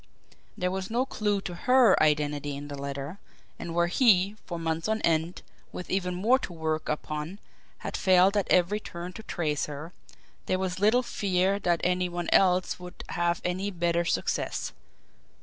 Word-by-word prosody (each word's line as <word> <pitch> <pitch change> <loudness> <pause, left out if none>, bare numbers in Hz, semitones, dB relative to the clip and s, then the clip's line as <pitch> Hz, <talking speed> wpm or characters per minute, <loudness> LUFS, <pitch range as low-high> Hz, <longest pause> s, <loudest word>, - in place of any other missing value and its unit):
There 180 0 0
was 190 0 -3
no 240 +3 +1
clew 210 -6 -1
to 180 - -5
HER 250 +4 +5
identity 145 -2 +1
in 145 +1 -8
the 145 - -5
letter; 140 +6 -5 0.4
and 170 -1 -5
where 170 0 +3
he, 195 0 +4
for 170 - -4
months 165 +1 -2
on 220 0 0
end, 165 +1 0 0.3
with 180 - -7
even 180 -2 0
more 230 +8 +3
to - - -6
work 160 -1 -2
upon, 150 +4 -3 0.4
had - - -5
failed 185 +1 +4
at 205 - 0
every 185 +4 +3
turn 175 -2 -7
to 220 - -8
trace 155 -8 -2
her, 150 +4 -7 0.5
there 185 - +1
was 185 -1 -2
little 220 +5 +4
fear 195 -3 0
that 175 -4 +1
any 180 0 +1
one 175 0 -3
else 185 -1 +3
would 180 0 -10
have 175 0 0
any 185 +3 -1
better 170 -2 0
success. 170 - -1
180 Hz, 170 wpm, -28 LUFS, 165-195 Hz, 0.5 s, HER